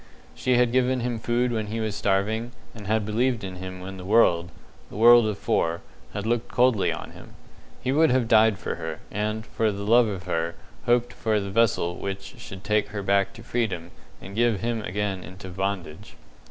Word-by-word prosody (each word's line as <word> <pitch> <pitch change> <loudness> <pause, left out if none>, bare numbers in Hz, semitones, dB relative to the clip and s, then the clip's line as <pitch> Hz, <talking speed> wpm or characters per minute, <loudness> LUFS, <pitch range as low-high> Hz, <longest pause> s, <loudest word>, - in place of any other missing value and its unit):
She 125 -1 +1
had 125 -1 +3
given 130 0 +2
him 120 -1 -2
food 120 +2 0
when 110 -2 -2
he 110 +2 -3
was 110 -2 -2
starving, 110 +5 0 0.2
and 105 -4 -10
had 110 0 +1
believed 115 +2 0
in 95 -1 -6
him 95 0 -7
when 95 +1 -7
the 90 - -8
world 90 -4 +3 0.4
the - - -11
world 120 +1 +7
of 105 -2 -2
four 85 -3 0 0.3
had 100 0 -3
looked 120 +1 0
coldly 125 -5 +2
on - - -6
him. - - -14 0.5
He 130 - 0
would 155 +3 +4
have 125 -2 +2
died 110 -2 +5
for - - -4
her, 80 -1 -5
and, 105 +2 -2
for 110 -1 0
love 110 +4 +3
of 95 -4 -4
her, 85 -1 -2 0.3
hoped 120 0 +2
for 110 -3 0
the 100 -1 -5
vessel 95 -5 +2
which 100 0 -5
should 95 0 -9
take 105 -1 +1
her 100 0 -5
back 100 0 +2
to 115 - -12
freedom 100 -9 -2 0.3
and 100 +1 -10
give 115 -3 +2
him 115 -1 -1
again 100 -1 -3
into 95 0 -10
bondage. 95 -1 -4
105 Hz, 195 wpm, -25 LUFS, 95-115 Hz, 0.5 s, world